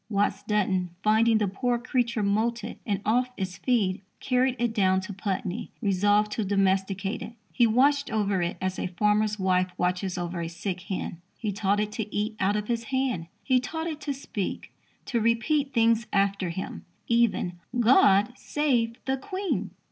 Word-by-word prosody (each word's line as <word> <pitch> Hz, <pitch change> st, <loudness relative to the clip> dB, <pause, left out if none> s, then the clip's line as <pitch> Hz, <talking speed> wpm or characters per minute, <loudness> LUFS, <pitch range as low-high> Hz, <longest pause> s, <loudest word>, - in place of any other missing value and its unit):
Watts 205 Hz, -1 st, +1 dB
Dunton, 190 Hz, -4 st, 0 dB
finding 220 Hz, +1 st, +4 dB
the 210 Hz, -2 st, +1 dB
poor 240 Hz, +5 st, 0 dB
creature 235 Hz, -2 st, 0 dB
moulted 220 Hz, +3 st, -1 dB
and 200 Hz, -1 st, 0 dB
"off 245 Hz, +4 st, +2 dB
its 185 Hz, -2 st, -4 dB
feed," 200 Hz, -8 st, +1 dB, 0.2 s
carried 255 Hz, 0 st, +1 dB
it 235 Hz, -1 st, 0 dB
down 190 Hz, -3 st, +3 dB
to 200 Hz, +2 st, -7 dB
Putney, 195 Hz, +2 st, -3 dB
resolved 205 Hz, 0 st, +2 dB
to 220 Hz, -, -1 dB
domesticate 195 Hz, +1 st, 0 dB
it. 225 Hz, +1 st, -7 dB, 0.2 s
He 240 Hz, -, +4 dB
watched 280 Hz, +5 st, +3 dB
over 205 Hz, -4 st, 0 dB
it 175 Hz, 0 st, -2 dB
as 185 Hz, 0 st, -2 dB
a -, -, -1 dB
farmer's 210 Hz, +3 st, +1 dB
wife 185 Hz, -1 st, +1 dB
watches 180 Hz, +1 st, -1 dB
over 175 Hz, 0 st, -3 dB
a 165 Hz, -, -3 dB
sick 180 Hz, +2 st, -4 dB
hen. 180 Hz, -2 st, -5 dB, 0.2 s
He 215 Hz, -3 st, -2 dB
taught 200 Hz, 0 st, +1 dB
it 210 Hz, 0 st, -1 dB
to 210 Hz, -1 st, -4 dB
eat 210 Hz, +1 st, -1 dB
out 195 Hz, +2 st, +2 dB
of 210 Hz, 0 st, -2 dB
his 230 Hz, -1 st, -1 dB
hand. 250 Hz, -9 st, -1 dB, 0.2 s
He 260 Hz, -2 st, +3 dB
taught 320 Hz, +6 st, -4 dB
it 310 Hz, -3 st, -4 dB
to 290 Hz, -, -2 dB
speak 265 Hz, -8 st, -5 dB, 0.3 s
to 235 Hz, -3 st, 0 dB
repeat 270 Hz, +6 st, +1 dB
things 230 Hz, -1 st, +3 dB
after 200 Hz, -2 st, +1 dB
him, 180 Hz, +3 st, -5 dB, 0.2 s
even 230 Hz, -7 st, +1 dB, 0.2 s
"God 220 Hz, -2 st, +5 dB
Save 250 Hz, -6 st, 0 dB
the 265 Hz, 0 st, 0 dB
Queen." 375 Hz, +7 st, -3 dB
210 Hz, 170 wpm, -27 LUFS, 190-240 Hz, 0.3 s, God